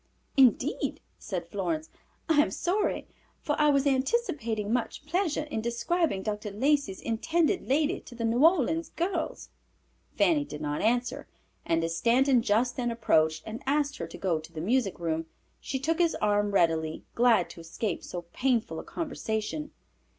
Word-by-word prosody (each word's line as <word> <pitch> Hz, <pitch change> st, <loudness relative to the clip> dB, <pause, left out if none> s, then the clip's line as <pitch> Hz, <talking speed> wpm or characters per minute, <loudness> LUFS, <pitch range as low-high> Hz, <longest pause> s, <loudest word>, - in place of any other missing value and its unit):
"Indeed," 265 Hz, -3 st, +3 dB, 0.2 s
said 185 Hz, -5 st, -4 dB
Florence. 170 Hz, -6 st, -2 dB, 0.4 s
"I 315 Hz, -3 st, +5 dB
am 300 Hz, -, +1 dB
sorry, 385 Hz, +4 st, -1 dB, 0.3 s
for 295 Hz, -, -1 dB
I 300 Hz, 0 st, +5 dB
was 280 Hz, -1 st, +3 dB
anticipating 265 Hz, -, 0 dB
much 250 Hz, +3 st, -2 dB
pleasure 335 Hz, -2 st, 0 dB
in 295 Hz, -7 st, -4 dB
describing 235 Hz, -, 0 dB
Dr. 210 Hz, 0 st, -3 dB
Lacey's 260 Hz, -1 st, +1 dB
intended 325 Hz, -, 0 dB
lady 305 Hz, +6 st, +2 dB
to 245 Hz, -, -13 dB
the 230 Hz, -1 st, -2 dB
New 235 Hz, +4 st, +2 dB
Orleans 325 Hz, -1 st, +3 dB
girls." 345 Hz, -1 st, -3 dB, 0.7 s
Fanny 310 Hz, -4 st, +3 dB
did 150 Hz, -, -8 dB
not 150 Hz, -1 st, -2 dB
answer, 245 Hz, +2 st, 0 dB, 0.4 s
and 165 Hz, 0 st, +2 dB
as 165 Hz, 0 st, -1 dB
Stanton 250 Hz, +6 st, +4 dB
just 230 Hz, +4 st, +1 dB
then 240 Hz, -2 st, 0 dB
approached, 160 Hz, -9 st, +2 dB
and 220 Hz, +2 st, -6 dB
asked 290 Hz, 0 st, +1 dB
her -, -, -4 dB
to -, -, -10 dB
go 175 Hz, -5 st, 0 dB
to 155 Hz, +1 st, -12 dB
the 160 Hz, -, -7 dB
music 210 Hz, +2 st, +1 dB
room, 165 Hz, -1 st, -2 dB, 0.3 s
she 270 Hz, -, -3 dB
took 320 Hz, +6 st, -1 dB
his 340 Hz, -2 st, +3 dB
arm 205 Hz, 0 st, +1 dB
readily, 165 Hz, -5 st, +1 dB
glad 230 Hz, -6 st, +4 dB
to -, -, -12 dB
escape 170 Hz, +3 st, -4 dB
so 175 Hz, -1 st, -6 dB
painful 235 Hz, -10 st, 0 dB
a -, -, -7 dB
conversation. 290 Hz, -1 st, -3 dB
235 Hz, 160 wpm, -28 LUFS, 195-295 Hz, 0.7 s, I